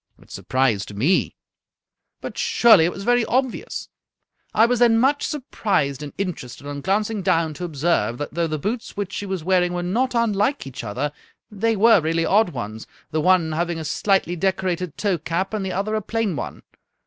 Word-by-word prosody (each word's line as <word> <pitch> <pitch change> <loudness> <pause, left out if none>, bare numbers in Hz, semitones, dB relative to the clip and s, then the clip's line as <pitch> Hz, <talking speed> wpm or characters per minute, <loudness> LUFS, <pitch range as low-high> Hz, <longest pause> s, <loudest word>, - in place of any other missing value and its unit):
" - - -35
It - - -21
surprised 115 -6 -1
me." 145 - +1 0.4
" - - -59
But, - - -6
surely, 220 -9 +5
it 175 - +1
was 195 - -7
very 245 +2 +3
obvious. 255 0 -2 0.6
I 225 - +5
was 245 0 +1
then 235 -2 +5
much 275 +5 +2
surprised 195 - -1
and 145 -1 -6
interested 155 -9 -5
on 145 0 -5
glancing 210 +4 0
down 165 -4 +1
to 175 +5 -5
observe 145 -8 0
that, 145 +1 -5
though 170 +1 0
the 155 -1 -2
boots 220 - -4
which 205 -1 -3
she 205 - -4
was 190 -4 -3
wearing 180 0 +2
were 175 0 -2
not 240 +8 0
unlike 230 +3 +1
each 130 -2 -7
other, 115 +7 -2 0.4
they 225 +2 0
were 220 -2 +5
really 165 +1 0
odd 210 0 +3
ones, 110 -7 -6 0.2
the 155 - 0
one 175 -1 +3
having 170 +1 -1
a 160 - -5
slightly 180 +3 +1
decorated 180 -2 -1
toe 195 -5 0
cap. 170 +6 -2
and 210 -2 -1
the 190 - -3
other 200 +4 -2
a 215 - 0
plain 220 -3 -1
one. - - -6
185 Hz, 195 wpm, -22 LUFS, 155-215 Hz, 0.6 s, surely